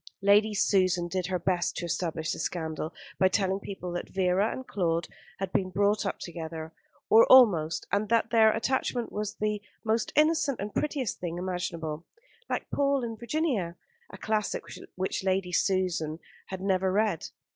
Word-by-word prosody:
Lady 205 +2 +5
Susan 185 -3 +2
did 180 0 -2
her 185 0 0
best 175 0 0
to 175 - -3
establish 165 -1 -2
the - - -4
scandal 160 -2 -3 0.3
by 190 - +6
telling 190 0 +1
people 190 -3 -6
that 175 - -4
Vera 190 +2 +1
and 260 - -6
Claude 170 -6 -1 0.3
had 190 -1 -4
been 185 -1 +1
brought 205 +2 +1
up - - -2
together, 160 -2 -7 0.3
or 225 +1 +7
almost, 180 -12 +6
and 205 +1 0
that 230 0 +2
their 220 -2 +6
attachment 240 +1 -1
was 210 0 -3
the 210 -1 -1 0.2
most 220 0 0
innocent 300 -3 +3
and 205 +1 -4
prettiest 285 -7 -2
thing 175 -1 -4
imaginable 170 -3 -3 0.5
"like - - -2
Paul 280 -2 +1
and 225 -2 -5
Virginia" 235 - -1 0.3
a - - -10
classic 215 -1 -1 0.3
which 190 +1 -2
Lady 190 -1 0
Susan 180 -4 0 0.3
had 190 -1 -6
never 190 -1 +1
read. 205 -4 0
190 Hz, 160 wpm, -28 LUFS, 175-220 Hz, 0.5 s, or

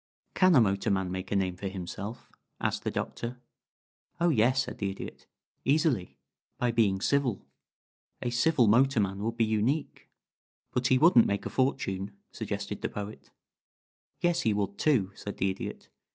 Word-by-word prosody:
"Can 185 -2 +5
a 130 - +7
motorman 95 -2 +1
make 95 +1 -5
a - - +1
name 95 -2 +1
for 100 +2 -5
himself?" 95 +4 -6 0.3
asked - - -1
the - - 0
Doctor. 120 +1 -4 0.8
"Oh 170 0 +3
yes," 130 -1 +3
said - - -8
the 100 - 0
Idiot. 95 - -8 0.4
"Easily. 140 - +1 0.4
By 125 -1 +1
being 105 -5 +2
civil. 135 -6 +1 0.8
A 120 - -1
civil 125 +2 +3
motorman 110 -4 +3
would 115 +1 -2
be 115 - +3
unique." 110 +8 -1 0.6
"But 125 +1 +1
he 130 - +4
wouldn't 140 -5 +6
make 100 0 -1
a - - -4
fortune," 100 -7 -1
suggested - - -4
the - - -1
Poet. 100 -10 -7 0.9
"Yes 175 0 +2
he 110 -3 +1
would, 100 -1 -2
too," 115 -11 +2
said 100 +1 -7
the 95 0 +1
Idiot. 95 - -7
110 Hz, 155 wpm, -29 LUFS, 100-130 Hz, 0.9 s, a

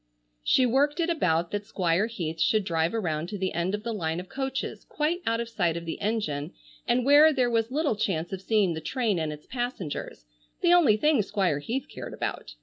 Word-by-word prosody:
She 255 - +4
worked 280 +6 +2
it 340 0 +1
about 170 - +1
that 205 0 -2
Squire 180 +3 +1
Heath 165 -8 -4
should 215 -2 +3
drive 165 +2 0
around 165 -6 -2
to 205 - -4
the 190 -1 -2
end 175 +4 0
of 210 - -7
the 230 0 -3
line 165 -5 -2
of 180 - -9
coaches, 270 0 -4
quite 320 +4 -1
out 230 0 +1
of 235 - -2
sight 180 -8 0
of 170 - -6
the 165 - -5
engine 180 -8 -2 0.3
and 245 +1 +2
where 295 +3 +7
there 255 -4 +1
was 225 -1 +1
little 290 -2 0
chance 175 -4 -2
of 190 - -4
seeing 200 -4 +2
the 160 - -5
train 220 - 0
and 155 -1 -2
its 150 0 -9
passengers,—the 170 - -3
only 300 -12 +5
thing 295 +1 +3
Squire 190 -7 0
Heath 245 - -3
cared - - -8
about. - - -4
210 Hz, 210 wpm, -27 LUFS, 165-250 Hz, 0.3 s, where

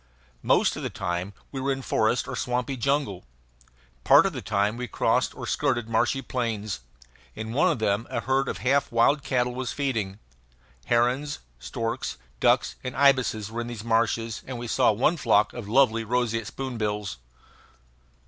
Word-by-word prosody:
Most - - +3
of - - -6
the - - -2
time 90 +2 -3 0.2
we 135 - -4
were 135 +1 0
in 135 0 -3
forest 110 +1 +1
or - - -4
swampy 125 +2 -1
jungle. 135 -7 -1 0.8
Part - - +7
of - - 0
the - - -5
time 100 +2 0
we 125 +1 -4
crossed - - +1
or - - -6
skirted 125 -6 0
marshy 115 +4 +1
plains. 110 -5 -2 0.6
In 110 +1 -5
one 165 +8 +4
of 150 - -1
them 110 0 0
a 120 -3 -2
herd 135 +2 +1
of - - -3
half 140 +2 +2
wild 120 +5 +3
cattle 125 -2 0
was 125 0 -3
feeding. 110 -9 -2 0.7
Herons, 125 +5 +1 0.2
storks, 115 - -3 0.2
ducks, - - +2
and 125 - -5
ibises 130 -6 +3
were 120 +1 -3
in 120 - -5
these 115 -3 -6
marshes, 115 -1 0
and 130 -2 -5
we 120 - -5
saw 115 - +3
one 130 +11 +2
flock 105 -6 +3
of 115 -4 -7
lovely 115 -2 +4
roseate 115 -1 0
spoonbills. 105 - -3
120 Hz, 165 wpm, -26 LUFS, 110-130 Hz, 0.8 s, Part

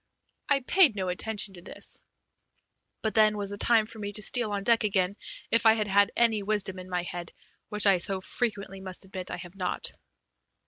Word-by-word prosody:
I 280 -1 +3
paid 300 - +4
no 190 -2 -2
attention 205 +2 0
to 175 - -12
this, - - 0 1.0
but 220 - -1
then 215 -1 +4
was 200 -1 -3
the - - -4
time 225 0 +3
for 225 0 -12
me 205 -1 -5
to 210 +1 0
steal 240 0 +1
on 200 -1 -3
deck 230 +1 +3
again 195 -2 0 0.4
if 230 0 +4
I 220 - +8
had 215 -2 -1
had 200 0 +3
any 225 -3 +3
wisdom 195 -2 -1
in 185 0 -10
my 180 -1 -2
head, 175 -1 -7 0.4
which 210 0 +2
I 195 -3 +5
so 195 +2 -2
frequently 200 -2 -3
must 190 0 -6
admit 185 -1 -7
I - - -5
have 175 0 -10
not. 185 -2 -2
205 Hz, 200 wpm, -27 LUFS, 190-220 Hz, 1.0 s, I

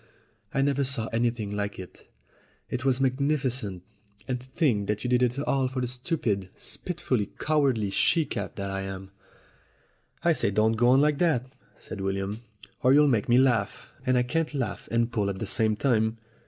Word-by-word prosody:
I 135 -1 +1
never 140 0 +1
saw 130 -4 +1
anything 115 -3 0
like 105 0 -3
it. 95 -1 -12 0.6
It 125 +1 -2
was 135 -2 +2
magnificent. 130 - 0 0.4
And 125 -2 -1
to 130 - -12
think 130 - +1
that 105 0 -2
you 125 - -1
did 125 0 +3
it 125 +1 +1
all 135 -2 +1
for 130 0 -4
the 125 - 0
stupid, 125 - -2
spiteful, 145 - -2
cowardly 135 -10 +1
she 160 - +3
cat - - -5
that 100 -1 -4
I 95 0 -2
am." 95 0 -7 1.1
"I 170 0 +4
say, 125 - +1
don't 110 +2 +2
go 115 +2 +2
on 130 +2 +6
like 150 -1 +2
that," 130 -7 +1 0.2
said 100 - -8
William, 95 +3 -2 0.4
"or 130 +2 +5
you'll 150 0 +6
make 115 -6 +1
me 120 - +6
laugh. 120 -6 +1
And 130 -1 +2
I 125 - +3
can't 155 +4 -1
laugh 130 -4 -3
and 115 +1 +1
pull 105 -3 0
at 95 - -3
the - - -3
same 110 -2 +2
time. 110 -2 +1
125 Hz, 185 wpm, -27 LUFS, 105-135 Hz, 1.1 s, on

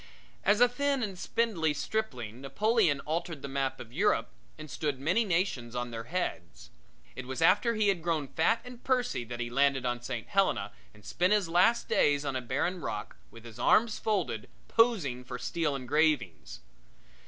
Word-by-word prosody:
As 205 +4 +3
a 245 - +8
thin 275 +1 0
and 200 -3 -3
spindly 180 -6 0
stripling 125 - -3
Napoleon 165 - +1
altered 160 -1 -4
the - - -3
map 135 -1 -2
of 120 0 -10
Europe 155 - +1 0.3
and 155 0 -9
stood 145 -2 -3
many 170 +12 +2
nations 165 - -1
on 120 0 -3
their 115 0 -6
heads. 85 - -4 0.4
It 130 -1 -7
was 130 0 -4
after 205 +8 +4
he 215 -1 +2
had 190 -4 0
grown 160 -4 -1
fat 225 - +1
and 250 -1 -11
pursy 250 - 0
that 120 +1 -7
he 120 -1 -3
landed 135 0 +2
on 120 -1 -1
St. 120 - -5
Helena - - +1 0.2
and 105 - -19
spent 180 +4 +1
his 205 -4 +2
last 180 +8 +3
days 145 0 +2
on 135 -2 -2
a 130 - -1
barren 145 +9 -2
rock, 105 -7 -5
with 115 0 -14
his 115 0 -11
arms 220 - +3
folded, 185 - -1 0.2
posing 185 - +2
for 125 0 -6
steel 145 +4 -1
engravings. 125 - 0
150 Hz, 175 wpm, -30 LUFS, 125-205 Hz, 0.4 s, a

